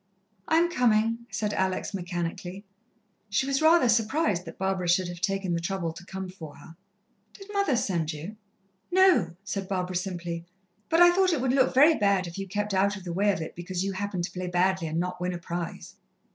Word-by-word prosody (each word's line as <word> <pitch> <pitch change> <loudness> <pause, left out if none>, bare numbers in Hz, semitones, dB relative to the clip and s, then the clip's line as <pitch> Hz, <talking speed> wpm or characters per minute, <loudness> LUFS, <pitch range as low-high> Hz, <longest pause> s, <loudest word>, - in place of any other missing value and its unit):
"I'm 335 +2 +3
coming," 230 -3 +2
said 210 -1 -2
Alex 190 +2 -1
mechanically. 180 +1 -4 0.6
She 205 +6 +1
was 275 +1 0
rather 320 -3 +5
surprised 225 - +1
that 165 - -9
Barbara 190 -2 -1
should 180 +1 +3
have 175 0 -8
taken 195 -2 -1
the 170 - 0
trouble 170 -1 -3
to 170 +2 -11
come 190 0 -5
for 170 -5 -10
her. 165 - -14 0.6
"Did 400 +1 -12
mother 400 -9 +2
send 170 -8 0
you?" 165 +7 -7 0.6
"No," 360 - +4
said 195 -1 -4
Barbara 185 -1 -2
simply; 175 -2 -3 0.5
"but 330 +1 +4
I 350 0 +9
thought 375 -1 +3
it 310 - 0
would 260 -1 +1
look 260 -1 +3
very 295 +5 +7
bad 200 -7 +2
if 170 +2 -7
you 195 - -4
kept 205 +2 -2
out 200 +2 +2
of 195 - -9
the 175 -2 -5
way 205 +3 +3
of 190 - -3
it 160 - -6
because 175 +1 -3
you 195 - -1
happened 195 -2 -3
to 170 - -3
play 185 0 -5
badly 180 0 +1
and 160 +1 -2
not 180 0 -3
win 180 0 -1
a - - -3
prize." 170 0 -6
190 Hz, 205 wpm, -27 LUFS, 175-225 Hz, 0.6 s, I